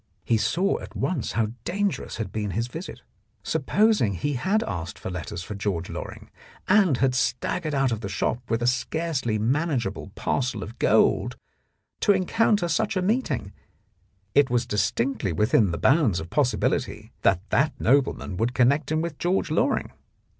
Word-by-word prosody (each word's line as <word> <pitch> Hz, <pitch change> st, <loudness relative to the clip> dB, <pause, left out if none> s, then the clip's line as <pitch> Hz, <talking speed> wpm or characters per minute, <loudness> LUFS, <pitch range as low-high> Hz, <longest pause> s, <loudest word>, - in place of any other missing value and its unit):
He 115 Hz, -, +2 dB
saw 185 Hz, -, +1 dB
at -, -, -10 dB
once 165 Hz, -11 st, -2 dB
how 110 Hz, -2 st, +1 dB
dangerous 200 Hz, +2 st, -2 dB
had 110 Hz, -4 st, -4 dB
been 105 Hz, 0 st, -2 dB
his 115 Hz, -, +1 dB
visit. 160 Hz, +10 st, -8 dB, 0.4 s
Supposing 210 Hz, -, +2 dB
he 145 Hz, +10 st, -2 dB
had 195 Hz, -, +1 dB
asked 85 Hz, -, -5 dB
for -, -, -6 dB
letters 90 Hz, 0 st, -5 dB
for 105 Hz, -, -6 dB
George 95 Hz, -4 st, -3 dB
Loring -, -, -8 dB, 0.4 s
and 190 Hz, -, +4 dB
had 130 Hz, 0 st, +2 dB
staggered 145 Hz, +5 st, -1 dB
out 135 Hz, -2 st, +2 dB
of 110 Hz, -1 st, -2 dB
the 100 Hz, -, -4 dB
shop 100 Hz, +4 st, -1 dB
with 115 Hz, +1 st, 0 dB
a -, -, +1 dB
scarcely 130 Hz, -1 st, 0 dB
manageable 125 Hz, -, -1 dB
parcel 135 Hz, 0 st, -1 dB
of 110 Hz, -, -10 dB
gold, -, -, +3 dB, 0.6 s
to 205 Hz, -, +4 dB
encounter 200 Hz, 0 st, +2 dB
such 170 Hz, +3 st, 0 dB
a -, -, +1 dB
meeting, 185 Hz, -, -1 dB, 0.8 s
it 145 Hz, -, +4 dB
was 120 Hz, -1 st, +1 dB
distinctly 105 Hz, +2 st, 0 dB
within 105 Hz, +4 st, +3 dB
the 85 Hz, -, -2 dB
bounds 130 Hz, -, +3 dB
of 80 Hz, +1 st, -8 dB
possibility 140 Hz, -4 st, 0 dB
that 95 Hz, +4 st, +2 dB
that 145 Hz, +3 st, +1 dB
nobleman 130 Hz, -7 st, +1 dB
would 120 Hz, +5 st, -1 dB
connect 140 Hz, +4 st, +3 dB
him 155 Hz, +1 st, +1 dB
with 165 Hz, -3 st, -5 dB
George 180 Hz, +2 st, 0 dB
Loring. -, -, +1 dB
130 Hz, 160 wpm, -25 LUFS, 105-165 Hz, 0.8 s, and